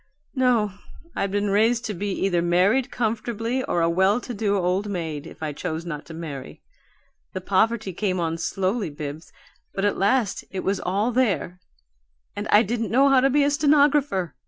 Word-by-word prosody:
No, 245 -6 +2 0.4
I'd 200 - -1
been 205 +1 0
raised 225 +3 +2
to 210 - -3
be 200 +2 -3
either 185 -2 0
married 185 +10 +2
comfortably 230 +2 -2
or 175 - 0
a 165 - +3
well 190 +6 +3
to 245 - -6
do 205 -2 0
old 185 +3 0
maid, 160 -5 -4
if 160 - -11
I 150 -1 -2
chose 160 +2 -4
not 150 -3 -6
to 165 - -9
marry. 145 -5 -8 0.7
The 185 - -4
poverty 200 +2 +1
came 185 0 -1
on 165 -1 -2
slowly, 195 +3 -1
Bibbs, 145 +2 -7 0.4
but 195 - 0
at 205 - 0
last 205 +1 +1
it 190 - -5
was 195 0 0
all 200 +6 0
there 205 -7 0 0.8
and - - -4
I 210 +2 +5
didn't 230 +1 -2
know 270 +4 +4
how 270 -1 +5
to 270 +2 +3
be 285 +2 +3
a 285 - +2
stenographer. 285 - +2
200 Hz, 180 wpm, -24 LUFS, 175-235 Hz, 0.8 s, I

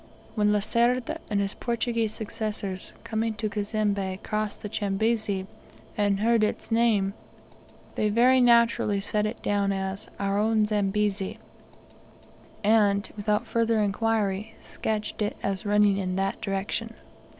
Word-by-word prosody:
When 210 -2 +2
Lacerda 235 +7 +1
and 205 -2 +1
his 200 0 -1
Portuguese 230 -2 -1
successors, 210 -4 -4
coming 220 0 -1
to 215 0 -2
Cazembe, 205 -3 -1
crossed 215 -1 -3
the - - -3
Chambezi, 205 -1 0 0.5
and 205 -1 +1
heard 230 0 +3
its 215 - -2
name, 220 -4 +3 0.8
they 215 - +1
very 250 +4 +5
naturally 235 -4 +4
set 210 +1 0
it 220 - -7
down 200 -1 +1
as 190 0 -3
"our 200 0 0
own 215 0 +3
Zambezi," 205 -1 0 1.3
and, 205 -1 +3
without 210 +2 0
further 230 0 +1
inquiry, 210 0 0
sketched 215 0 -4
it 210 - -1
as 195 0 -2
running 205 -1 +4
in 185 -2 -2
that 195 +1 -1
direction. 205 +3 -3
210 Hz, 130 wpm, -26 LUFS, 200-225 Hz, 1.3 s, very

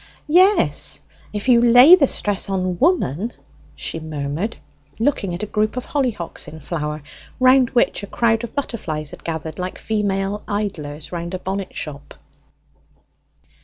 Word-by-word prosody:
"Yes; 375 +4 +4 0.3
if 210 +3 -4
you 240 -2 +6
lay 245 +7 +8
the 310 -7 +7
stress 205 -4 -1
on 185 -2 -1
'woman,'" 235 - +1 0.4
she 165 - -4
murmured, 155 +6 -4 0.4
looking 225 -6 0
at 180 - -5
a - - 0
group 215 +3 -1
of 250 - -3
hollyhocks 245 - -2
in 160 - -9
flower, 150 -1 -4 0.4
round 255 -1 +5
which 240 - +2
a 200 - -7
crowd 225 +1 +1
of 235 - -7
butterflies 160 - -3
had - - -12
gathered 160 -1 -5
like 180 0 -4
female 205 -1 -1
idlers 160 -8 -4
round 170 +1 -4
a - - -2
bonnet 190 +1 -5
shop. 145 -2 -7
200 Hz, 145 wpm, -21 LUFS, 165-235 Hz, 0.4 s, lay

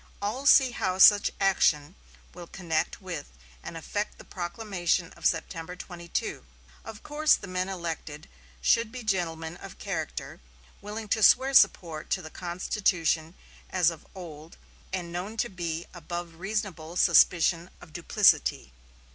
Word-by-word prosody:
All 225 +8 -2
see 265 -3 +7
how 185 -5 -2
such 205 +2 +7
action 165 -6 +2 0.4
will 175 0 -10
connect 165 -4 -2
with - - -6 0.3
and 165 - -8
affect 205 +6 -4
the - - -12
proclamation 180 -2 -2
of - - 0
September 165 +1 -3
22. 170 -2 -5 0.4
Of 220 -1 -10
course 305 +1 +3
the - - -9
men 185 0 -2
elected 165 -4 -6 0.4
should 230 - +3
be 250 0 -7
gentlemen 170 -5 -2
of - - -11
character, 60 +1 -5 0.4
willing 210 +2 -6
to 220 - +1
swear 260 +5 +5
support 165 -11 +3
to 190 - -1
the 155 - -9
Constitution 175 -2 -1 0.3
as 175 -2 +3
of 165 - -12
old, 160 -3 -10 0.3
and 180 -2 -4
known 190 +6 -5
to 240 - 0
be 170 -3 -4
above 175 0 -6
reasonable 185 -4 -4
suspicion 170 -1 +4
of 160 - -15
duplicity." 150 - +2
175 Hz, 140 wpm, -27 LUFS, 165-205 Hz, 0.4 s, see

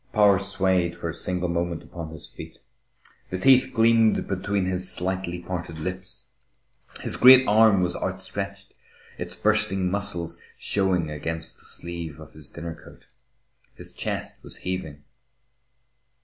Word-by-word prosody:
Power 105 -3 +5
swayed 95 -3 +1
for 85 -1 -5
a - - -4
single 90 +1 -1
moment 85 -1 -2
upon 85 -2 -8
his 80 -2 -7
feet. - - -11 0.7
The 90 - -3
teeth 130 +6 +5
gleamed 115 -1 +3
between 100 0 -1
his 90 0 +1
slightly 90 -1 -1
parted 85 -2 -5
lips. 90 +3 -6 0.8
His - - +1
great 130 +1 +8
arm 105 -2 +5
was 90 -1 0
outstretched, - - -5 0.5
its - - -5
bursting 105 -4 +1
muscles 100 -4 -1 0.2
showing 90 -5 0
against 80 +2 -5
the - - -21
sleeve 85 -3 -7
of 80 0 -13
his 75 -3 -11
dinner 85 0 -7
coat. 85 - -16 0.7
His - - -10
chest - - -4
was - - -8
heaving. 80 -6 -4
90 Hz, 135 wpm, -25 LUFS, 85-100 Hz, 0.8 s, great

